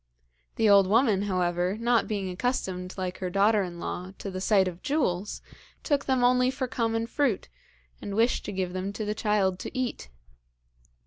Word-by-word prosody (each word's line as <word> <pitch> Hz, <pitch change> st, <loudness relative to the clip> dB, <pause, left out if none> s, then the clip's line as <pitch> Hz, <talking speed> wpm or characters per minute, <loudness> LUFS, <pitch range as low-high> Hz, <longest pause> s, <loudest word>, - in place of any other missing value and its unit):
The 225 Hz, -, +2 dB
old 200 Hz, -2 st, +6 dB
woman, 215 Hz, -1 st, +3 dB
however, 180 Hz, +1 st, 0 dB
not 235 Hz, 0 st, +2 dB
being 200 Hz, -3 st, -2 dB
accustomed, 185 Hz, -4 st, -3 dB
like 185 Hz, -1 st, -4 dB
her 185 Hz, -, -2 dB
daughter 205 Hz, +3 st, +3 dB
in 175 Hz, -2 st, -5 dB
law, 180 Hz, +2 st, -5 dB
to 195 Hz, -, -6 dB
the 185 Hz, 0 st, -5 dB
sight 195 Hz, -1 st, +3 dB
of 180 Hz, -1 st, -6 dB
jewels, 210 Hz, -, -1 dB, 0.4 s
took 285 Hz, -3 st, 0 dB
them 260 Hz, -2 st, +1 dB
only 250 Hz, +1 st, +4 dB
for 260 Hz, 0 st, -2 dB
common 225 Hz, -1 st, -1 dB
fruit, 240 Hz, -, -1 dB, 0.5 s
and 200 Hz, -, -5 dB
wished 230 Hz, +3 st, +2 dB
to -, -, -4 dB
give 185 Hz, -2 st, -3 dB
them 185 Hz, +2 st, -3 dB
to 215 Hz, -, -4 dB
the 210 Hz, -, -1 dB
child 210 Hz, -4 st, +1 dB
to -, -, -6 dB
eat. 245 Hz, -, -3 dB
205 Hz, 180 wpm, -27 LUFS, 185-235 Hz, 0.5 s, old